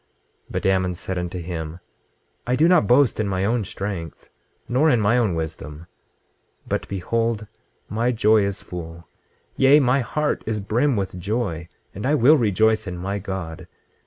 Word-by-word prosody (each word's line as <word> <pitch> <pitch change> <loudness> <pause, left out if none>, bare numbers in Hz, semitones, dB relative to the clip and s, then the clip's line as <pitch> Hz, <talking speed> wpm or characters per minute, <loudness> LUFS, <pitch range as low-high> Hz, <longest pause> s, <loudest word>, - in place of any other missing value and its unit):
26:11 - - -17
But - - -2
Ammon 95 -1 +1
said 95 +1 -5
unto 90 +1 -4
him: 85 -1 -5 0.7
I 125 - +2
do 155 +5 +4
not 180 - +4
boast 125 0 +4
in 110 - 0
my 95 0 -1
own 115 +1 +1
strength, 95 -4 -6 0.4
nor 135 +6 +3
in 125 -5 +3
my 105 +2 +3
own 110 -8 +1
wisdom; 80 -1 -6 0.8
but - - -2
behold, 110 +3 -1 0.4
my 115 +4 0
joy 110 -2 +4
is 100 -1 -3
full, 85 -1 -8 0.5
yea, 135 +2 +6
my 130 -1 +3
heart 150 +4 -1
is 110 -1 -1
brim 120 +7 +1
with 95 -3 -3
joy, 95 -4 -2 0.3
and 105 +6 -4
I 150 - +3
will 145 +3 +6
rejoice 110 -3 +2
in 90 -1 -5
my 100 +3 -3
God. 90 -3 -6
100 Hz, 165 wpm, -22 LUFS, 90-120 Hz, 0.8 s, yea